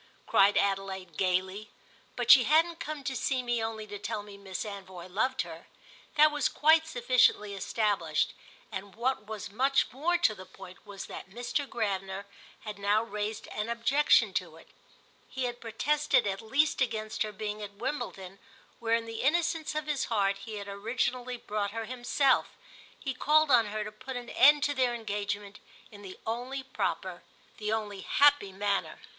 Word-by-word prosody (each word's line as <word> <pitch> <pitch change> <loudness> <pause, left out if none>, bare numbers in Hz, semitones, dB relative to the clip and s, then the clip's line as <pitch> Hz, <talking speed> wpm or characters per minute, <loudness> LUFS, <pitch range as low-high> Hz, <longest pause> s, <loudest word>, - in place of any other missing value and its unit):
cried 200 +1 +4
Adelaide 195 -3 -1
gaily. 190 +3 0 0.5
But - - +4
she 255 -4 +9
hadn't 325 +4 +3
come 300 -2 -5
to 265 0 -3
see 255 +1 0
me 240 -2 0
only 220 -1 -4
to 205 -1 -8
tell 210 0 -4
me 205 -1 -11
Miss 200 0 -6
Anvoy 190 -4 -8
loved 240 +8 0
her: - - -11 0.5
that 305 0 +6
was 295 -2 +1
quite 320 +1 +4
sufficiently 245 -6 +3
established, 195 -5 0 0.4
and 195 0 -7
what 235 -2 -1
was 215 -2 -6
much 270 +5 +2
more 320 +8 +1
to 295 -11 +3
the 185 -2 -11
point 185 0 -13
was 200 -1 -7
that - - -9
Mr. 245 +7 -3
Gravener 195 -3 -2 0.4
had 210 -2 -7
now 205 +2 +2
raised 210 -1 -4
an 210 +2 -3
objection 245 +6 +3
to - - -2
it. - - -17 0.6
He 260 - -4
had 245 -1 -3
protested 255 +3 +1
at 195 0 -2
least 275 +7 +1
against 220 -3 -1
her 215 -1 0
being 210 +1 -5
at 200 -1 -7
Wimbledon, 200 -6 -5 0.4
where 230 0 +2
in 230 0 -1
the 225 0 -5
innocence 325 +1 +1
of 305 0 -2
his 295 -3 -1
heart 200 -3 +1
he 215 +2 -7
had 200 -1 -6
originally 245 +4 -2
brought 210 -3 -2
her 225 - -2
himself; 255 +3 +1 0.4
he 270 - -3
called 305 +3 +3
on 235 -4 +5
her 215 +1 -3
to 210 - -7
put 255 +4 -7
an 245 -1 -7
end 290 +1 +6
to 290 - +1
their 255 -3 +1
engagement 205 -2 -4 0.3
in 205 -1 -12
the 190 -2 -9
only 250 +4 -3
proper, 265 -1 -3 0.4
the 210 -1 -2
only 210 -3 -2
happy 285 -3 +4
manner. 200 +1 -1
220 Hz, 175 wpm, -30 LUFS, 200-260 Hz, 0.6 s, she